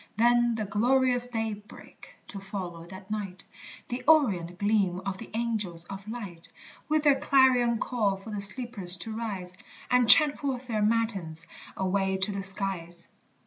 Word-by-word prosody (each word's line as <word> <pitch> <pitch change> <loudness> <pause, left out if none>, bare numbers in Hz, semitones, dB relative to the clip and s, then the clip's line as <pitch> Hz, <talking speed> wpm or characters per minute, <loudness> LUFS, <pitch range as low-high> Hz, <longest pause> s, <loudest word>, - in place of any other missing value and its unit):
Then 240 0 +3
the 215 -1 -3
glorious 245 +4 +3
daybreak, 220 -3 -7
to 200 - -7
follow 185 -4 -7
that 190 +2 -12
night, 195 -3 -5 0.5
The 245 +1 -4
orient 195 - +3
gleam 200 -3 +1
of 195 -1 -4
the 230 - -10
angels 210 -8 -3
of 195 +1 -9
light, 200 -8 -7 0.4
With 310 -1 +1
their 280 -3 +4
clarion 255 -4 +3
call 215 -5 -1
for 195 +3 -11
the 205 -1 -3
sleepers 200 -4 +2
to 220 +3 -6
rise. 195 -6 -5 0.4
And 250 -2 +3
chant 300 -3 +7
forth 265 -3 -3
their 220 -4 -2
matins, 210 -8 -1 0.3
away 190 0 0
to 190 +2 0
the 200 -1 -4
skies. 190 -3 -2
210 Hz, 150 wpm, -27 LUFS, 190-240 Hz, 0.5 s, chant